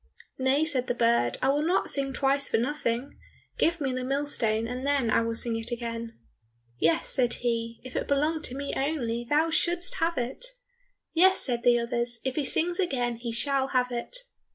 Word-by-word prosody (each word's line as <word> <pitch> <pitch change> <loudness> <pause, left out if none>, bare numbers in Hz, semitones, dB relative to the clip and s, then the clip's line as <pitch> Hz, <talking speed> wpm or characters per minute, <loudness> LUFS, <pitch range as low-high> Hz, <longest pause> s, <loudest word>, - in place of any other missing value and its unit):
"Nay," 265 +4 +2
said 265 -5 0
the 245 - -1
bird, 230 - +2
"I 265 - +3
will 285 +2 +2
not 340 +5 +1
sing 275 -1 -2
twice 275 +1 +1
for - - +1
nothing. 250 0 -2 0.4
Give 335 +1 +2
me 270 -3 -1
the 255 0 -3
millstone, 255 -5 0
and 250 +2 -5
then 275 -5 +1
I - - +4
will 230 0 -2
sing 230 0 -2
it 225 +1 -6
again." 230 -1 -5 0.6
"Yes," 165 +1 +2
said 245 -2 +2
he, 230 -1 -1
"if 255 0 -10
it - - -2
belonged 305 +3 +1
to 250 - 0
me 280 +1 -4
only, 240 -5 -2
thou 315 +3 +2
shouldst 345 +2 +1
have 335 +1 0
it." 250 - -3 0.7
"Yes," 375 +3 +5
said 240 -3 +2
the 240 0 +4
others, 235 0 -1
"if 260 -1 -1
he 300 - -1
sings 345 +7 0
again 245 -10 0
he 235 0 -5
shall 270 +3 +1
have 250 -1 +2
it." 240 - -4
255 Hz, 195 wpm, -27 LUFS, 235-290 Hz, 0.7 s, Yes